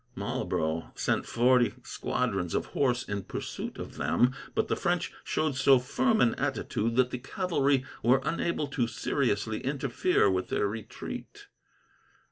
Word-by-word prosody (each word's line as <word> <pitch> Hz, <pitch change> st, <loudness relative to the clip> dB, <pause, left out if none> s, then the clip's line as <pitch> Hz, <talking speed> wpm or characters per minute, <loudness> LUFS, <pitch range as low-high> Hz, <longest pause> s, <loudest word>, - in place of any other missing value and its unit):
Marlborough 80 Hz, +1 st, -2 dB
sent -, -, 0 dB
forty 120 Hz, -2 st, +3 dB
squadrons 100 Hz, -7 st, -2 dB
of -, -, 0 dB
horse 125 Hz, -3 st, +1 dB
in 100 Hz, 0 st, -2 dB
pursuit -, -, -5 dB
of -, -, -7 dB
them, 120 Hz, +11 st, +2 dB, 0.2 s
but -, -, +1 dB
the -, -, +1 dB
French -, -, -1 dB
showed 155 Hz, -3 st, 0 dB
so 135 Hz, 0 st, +6 dB
firm 220 Hz, -, +1 dB
an 115 Hz, -, +4 dB
attitude 115 Hz, +2 st, -1 dB
that 130 Hz, 0 st, +3 dB
the 125 Hz, -, -3 dB
cavalry 140 Hz, -3 st, +1 dB, 0.2 s
were 125 Hz, +3 st, +4 dB
unable 170 Hz, 0 st, -1 dB
to 130 Hz, -4 st, -1 dB
seriously 110 Hz, -2 st, -1 dB
interfere 140 Hz, -, +1 dB
with 95 Hz, -1 st, 0 dB
their 105 Hz, -, +1 dB
retreat. 110 Hz, +1 st, -7 dB
125 Hz, 140 wpm, -29 LUFS, 110-140 Hz, 0.2 s, so